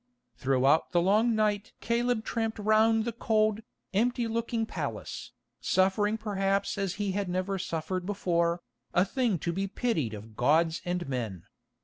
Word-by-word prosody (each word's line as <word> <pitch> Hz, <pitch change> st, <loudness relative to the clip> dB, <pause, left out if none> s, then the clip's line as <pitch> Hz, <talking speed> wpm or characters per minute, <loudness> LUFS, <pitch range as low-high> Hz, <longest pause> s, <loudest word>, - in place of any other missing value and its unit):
Throughout 135 Hz, +6 st, +2 dB
the 175 Hz, -, +5 dB
long 215 Hz, +6 st, +3 dB
night 210 Hz, -1 st, 0 dB
Caleb 235 Hz, -1 st, 0 dB
tramped 225 Hz, -1 st, -2 dB
round 220 Hz, +1 st, +3 dB
the 235 Hz, -, -1 dB
cold, 215 Hz, -1 st, +1 dB, 0.3 s
empty 240 Hz, +3 st, +1 dB
looking 230 Hz, 0 st, -1 dB
palace, -, -, -5 dB, 0.3 s
suffering 205 Hz, +3 st, +2 dB
perhaps 200 Hz, -2 st, 0 dB
as 195 Hz, -2 st, -2 dB
he 205 Hz, -1 st, -1 dB
had 195 Hz, -1 st, -2 dB
never 185 Hz, +2 st, -1 dB
suffered 175 Hz, +2 st, -3 dB
before, 175 Hz, -3 st, 0 dB, 0.3 s
a 180 Hz, -, +5 dB
thing 230 Hz, -1 st, 0 dB
to 170 Hz, +2 st, -2 dB
be 195 Hz, +3 st, -1 dB
pitied 165 Hz, -, -1 dB
of 110 Hz, +1 st, -11 dB
gods 160 Hz, +7 st, +2 dB
and 175 Hz, -2 st, -2 dB
men. 115 Hz, -10 st, -3 dB
195 Hz, 145 wpm, -29 LUFS, 170-220 Hz, 0.3 s, the